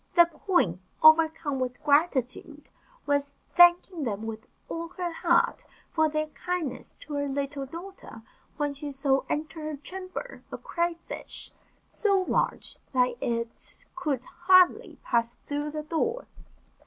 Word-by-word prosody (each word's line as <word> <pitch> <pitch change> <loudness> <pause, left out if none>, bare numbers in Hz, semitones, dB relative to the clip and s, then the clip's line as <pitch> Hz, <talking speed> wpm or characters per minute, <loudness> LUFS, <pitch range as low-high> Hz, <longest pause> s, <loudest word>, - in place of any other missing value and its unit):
The 345 -1 +8
queen, 310 - 0 0.2
overcome 315 -3 +5
with 250 -1 -2
gratitude, 290 -1 +1 0.3
was 285 0 0 0.2
thanking 350 0 +6
them 215 -4 -2
with 220 -1 -6 0.2
all 335 0 -4
her 355 -2 -2
heart 340 +1 +2 0.3
for 315 -1 +3
their 310 0 0
kindness 330 -6 -4
to 300 - -8
her 285 0 -1
little 275 0 -3
daughter, 335 - -10 0.3
when 290 -2 0
she 290 +1 -6
saw 270 -1 +2
enter 310 +1 -3
her 305 -1 -4
chamber 370 - -7
a - - -4
cray 340 0 -1
fish, - - -7 0.4
so 395 -3 +1
large - - -1
that 250 -1 +3
it 230 -1 -3
could 300 -8 -1
hardly 360 +1 +4
pass 235 0 0
through 290 +1 -2
the 305 0 -4
door. 455 +11 -1
305 Hz, 135 wpm, -28 LUFS, 270-345 Hz, 0.4 s, The